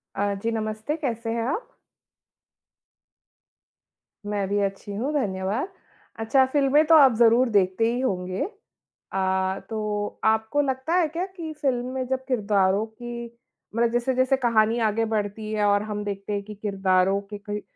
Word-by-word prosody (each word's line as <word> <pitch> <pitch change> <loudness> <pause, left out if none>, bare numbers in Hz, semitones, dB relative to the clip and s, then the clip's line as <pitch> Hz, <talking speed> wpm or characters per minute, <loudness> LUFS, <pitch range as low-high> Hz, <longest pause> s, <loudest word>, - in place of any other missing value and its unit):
अ, 200 0 0
जी 230 - 0
नमस्ते, 220 +5 -2
कैसे 235 -7 -3
हैं 230 0 -1
आप? 455 - -3 2.6
मैं 205 -2 -1
भी 205 +1 +1
अच्छी 200 +1 -3
हूँ, 255 +9 -2
धन्यवाद। 205 - -1 0.5
अच्छा, 240 +4 +3
फ़िल्में 280 +2 +3
तो 325 +1 +6
आप 275 -5 +7
ज़रूर 235 +2 +5
देखते 200 +2 +2
ही 245 - -2
होंगे 185 - -1 0.7
अ, 190 0 0
तो 210 -2 -3
आपको 220 +6 +2
लगता 265 +2 -2
है 345 -3 +3
क्या 335 +4 -3
कि 350 -4 -7
फ़िल्म 245 -3 0
में 260 -1 -2
जब 260 0 -2
किरदारों 205 -4 +2
की 235 +2 -7 0.5
मतलब 235 0 +2
जैसे-जैसे 255 +2 +2
कहानी 230 -3 +2
आगे 225 +2 0
बढ़ती 215 0 -2
है 210 -1 +1
और 205 0 +3
हम 210 -1 -4
देखते 200 0 -4
हैं 200 0 -2
कि 210 +1 -9
किरदारों 195 -2 +1
के 205 +1 -9
कई 205 0 -5
अ, - - -6
220 Hz, 155 wpm, -25 LUFS, 205-260 Hz, 2.6 s, आप